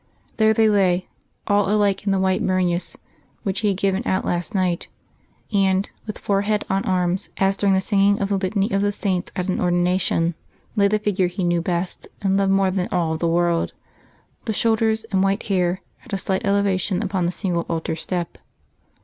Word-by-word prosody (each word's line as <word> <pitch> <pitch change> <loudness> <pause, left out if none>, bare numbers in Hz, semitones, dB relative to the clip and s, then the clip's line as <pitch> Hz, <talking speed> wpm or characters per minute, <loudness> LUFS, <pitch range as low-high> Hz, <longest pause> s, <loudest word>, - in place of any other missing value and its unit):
There 220 0 +4
they 220 0 +4
lay, 190 -3 +2 0.4
all 205 -1 +2
alike 205 -1 +1
in - - +3
the 195 - +2
white 190 0 +1
burnous 185 -1 0 0.5
which 195 -2 -1
he 215 - 0
had 195 -2 +1
given 195 0 +1
out 190 - 0
last 175 +5 -2
night; 180 -3 0 0.7
and, 195 0 +2 0.2
with 215 - -5
forehead 205 +1 0
on 195 +1 +1
arms, 185 -2 0
as 195 0 +2
during 195 -1 +2
the 190 - +2
singing 200 0 +2
of 200 - -1
the 200 - +1
Litany 195 +3 0
of 195 - +1
the 205 0 +2
Saints 190 -3 -2
at 180 0 -2
an 185 - -1
ordination, 175 -1 +1 0.4
lay 200 -2 +4
the 215 +1 +2
figure 200 -3 0
he 180 +2 -4
knew 175 -1 +1
best 175 +1 -3 0.2
and 195 -1 +2
loved 195 0 +2
more 195 -1 +3
than 185 -1 -1
all 165 -3 0
the 170 +1 -1
world, 170 0 +1 0.7
the 220 - -1
shoulders 220 0 +1
and 190 -2 +2
white 195 +1 +1
hair 185 -2 0 0.2
at 245 - -12
a - - +1
slight 190 0 -2
elevation 200 -1 +1
upon 190 -3 0
the - - 0
single 180 -3 -2
altar 165 -1 -2
step. 175 +1 -4
190 Hz, 190 wpm, -22 LUFS, 180-200 Hz, 0.7 s, There